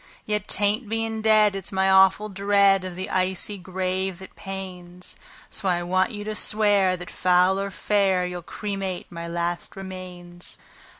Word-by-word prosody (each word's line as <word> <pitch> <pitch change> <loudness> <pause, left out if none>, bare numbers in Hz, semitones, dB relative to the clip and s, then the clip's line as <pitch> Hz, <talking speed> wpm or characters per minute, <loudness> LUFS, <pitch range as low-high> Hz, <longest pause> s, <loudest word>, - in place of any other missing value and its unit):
Yet 210 -1 -1
'tain't 210 +2 +1
being 225 0 -2
dead 215 -2 +5
it's 195 -2 -5
my 190 0 +2
awful 190 +2 +5
dread 200 -1 +3
of 185 -1 -6
the 185 +2 -4
icy 190 +2 0
grave 185 0 -2
that 190 0 -12
pains; 185 -2 -7 0.4
So 195 -3 0
I 175 -1 +1
want 185 +2 +2
you 205 -1 -6
to 215 +1 -3
swear 205 -3 +2
that, 180 0 -9
foul 180 +1 +3
or 200 0 -2
fair, 195 -2 +1
you'll 180 0 -5
cremate 195 0 -5
my 170 -1 -6
last 170 +1 -3
remains." 180 -2 -8
190 Hz, 160 wpm, -24 LUFS, 180-205 Hz, 0.4 s, dead